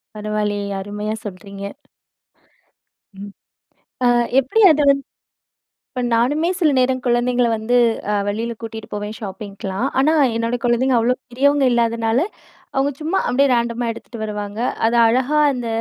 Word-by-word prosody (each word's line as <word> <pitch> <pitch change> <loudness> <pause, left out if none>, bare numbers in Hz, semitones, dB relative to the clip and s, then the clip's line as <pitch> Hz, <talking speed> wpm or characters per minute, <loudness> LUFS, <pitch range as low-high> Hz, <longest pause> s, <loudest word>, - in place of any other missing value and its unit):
பரவாயில்லையே! 210 -1 -2
அருமையா 210 +2 -4
சொல்றீங்க. 200 0 -8 1.6
ம். 200 0 -8 0.8
அ - - +6 0.3
எப்படி 275 - 0
அது 300 0 +1
வந் 275 0 +2 0.9
இப்போ 255 - -4
நானுமே 290 +9 +2
சில 320 -5 +3
நேரம் 255 0 +1
குழந்தைங்கள 245 0 +2
வந்து, 220 +3 0 0.3
அ - - +1
வெளியில 225 +3 -2
கூட்டிகிட்டு 225 -1 -8
போவேன் 210 +1 -5
ஷாப்பிங்க்கலாம், 200 +1 -5
ஆனா 305 +4 +3 0.2
என்னோட 230 +1 -1
குழந்தைங்க 245 +1 +2
அவ்வளோ 240 +2 +2 0.2
பெரியவங்க 280 +3 +2
இல்லாதனால, 230 0 +1 0.6
அவங்க 275 +2 +1
சும்மா 330 +5 0
அப்படியே 275 +2 +3
ரேண்டமா 235 0 0
எடுத்துட்டு 230 -1 -9
வருவாங்க, 210 0 -5 0.3
அதை 235 +1 +2
அழகா 260 +5 +1
அந்த 245 -2 -4
235 Hz, 130 wpm, -20 LUFS, 210-255 Hz, 1.6 s, அ